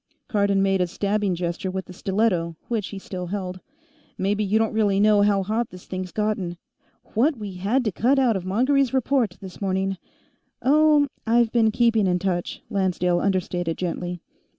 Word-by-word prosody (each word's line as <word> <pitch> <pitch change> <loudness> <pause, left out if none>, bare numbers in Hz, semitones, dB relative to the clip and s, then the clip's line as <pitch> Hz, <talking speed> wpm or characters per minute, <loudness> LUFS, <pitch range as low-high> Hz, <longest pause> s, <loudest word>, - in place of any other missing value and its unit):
Cardon 200 -3 +2
made 195 -1 +2
a 180 - +1
stabbing 200 +1 -1
gesture 175 +3 -3
with 190 0 -4
the 180 - -11
stiletto, 185 -4 0
which 220 -5 -1
he 200 - -7
still 185 -2 -6
held. 185 -1 -4 0.6
"Maybe 205 +2 0
you 210 +2 +2
don't 225 0 +1
really 205 -3 +2
know 210 0 +5
how 205 -1 +3
hot 220 +4 -1
this 180 0 -12
thing's 185 -1 -5
gotten. 205 -5 -2 0.6
What 270 +6 +2
we 205 -3 -6
had 225 +8 0
to 215 - +1
cut 250 +9 +2
out 250 -5 +3
of 190 - -3
Mongery's 260 +7 +2
report, 255 -6 +1
this 190 0 -10
morning 195 0 -1 0.4
" - - -39 0.3
"Oh, 300 +1 +5 0.2
I've 230 0 +3
been 225 -2 +3
keeping 225 -2 +2
in 180 -1 +2
touch," 180 -1 -3
Lancedale 180 -4 +1
understated 180 -3 -1
gently. 175 -1 -4
200 Hz, 175 wpm, -24 LUFS, 185-225 Hz, 0.6 s, know